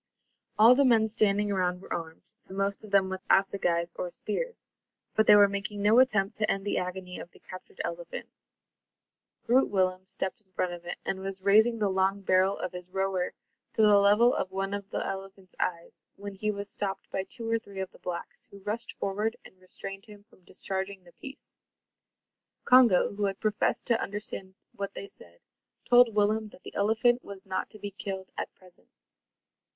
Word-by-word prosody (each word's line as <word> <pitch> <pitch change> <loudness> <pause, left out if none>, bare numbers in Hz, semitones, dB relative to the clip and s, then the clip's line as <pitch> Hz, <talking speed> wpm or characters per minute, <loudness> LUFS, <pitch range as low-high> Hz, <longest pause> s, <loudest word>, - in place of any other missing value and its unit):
All 225 +3 +9
the 280 +2 +4
men 230 -4 +4
standing 210 -2 +1
around 180 -2 0
were - - -6
armed, 165 -1 -6 0.2
the 190 - -9
most 195 +1 -1
of 215 - -10
them 195 -1 +4
with 190 0 -5
assegais 175 -3 +2
or 180 - -4
spears, 455 - -5 0.5
but 220 - +2
they - - +9
were 205 -1 +8
making 200 +1 -4
no 215 +4 +6
attempt 215 -6 +2
to 215 - +1
end 195 0 -1
the 205 - 0
agony 180 0 -5
of - - -9
the - - -20
captured 185 - -12
elephant. - - -6 1.2
Groot 255 +3 +4
Willem 185 -1 0
stepped 190 +4 -4
in 190 -3 -37
front 180 0 -1
of 175 0 -9
it, 175 - -4
and 190 - -2
was 190 0 -6
raising 220 +4 +5
the 210 -2 +1
long 190 +1 +1
barrel 190 +1 +3
of 185 - -4
his 180 0 -9
roer 190 -1 -1 0.4
to - - +2
the 205 -1 +7
level 210 +5 +5
of 185 - -1
one 195 +1 -2
of 200 -1 -5
the - - -2
elephant's 195 -1 -7
eyes, 170 -2 -3
when 200 0 -7
he 210 +2 -2
was 200 -1 -3
stopped 195 -1 -4
by 190 - -1
two 230 +4 -7
or 230 0 +1
three 200 -3 -10
of 190 -1 -4
the - - -18
blacks, 175 -1 -6
who 200 - -12
rushed 225 +4 -4
forward 210 +3 -1
and 185 - -16
restrained 195 +2 -9
him 205 -1 -13
from 205 -4 -25
discharging 190 0 -4
the 175 - -17
piece. 275 +1 -12 1.1
Congo, 245 -7 +6
who 205 0 -1
had 195 -1 -2
professed 215 -1 0
to 235 - +2
understand 195 -2 -5 0.2
what 200 0 -5
they 200 - -6
said, 85 - -17 0.5
told 245 -2 +6
Willem 215 +1 +2
that 185 - -18
the - - -9
elephant 230 +4 +2
was 195 -1 -10
not 190 -1 -3
to - - -13
be 205 -1 -6
killed 190 -1 -6
at - - -4
present. 185 -1 -21
200 Hz, 195 wpm, -29 LUFS, 190-215 Hz, 1.2 s, All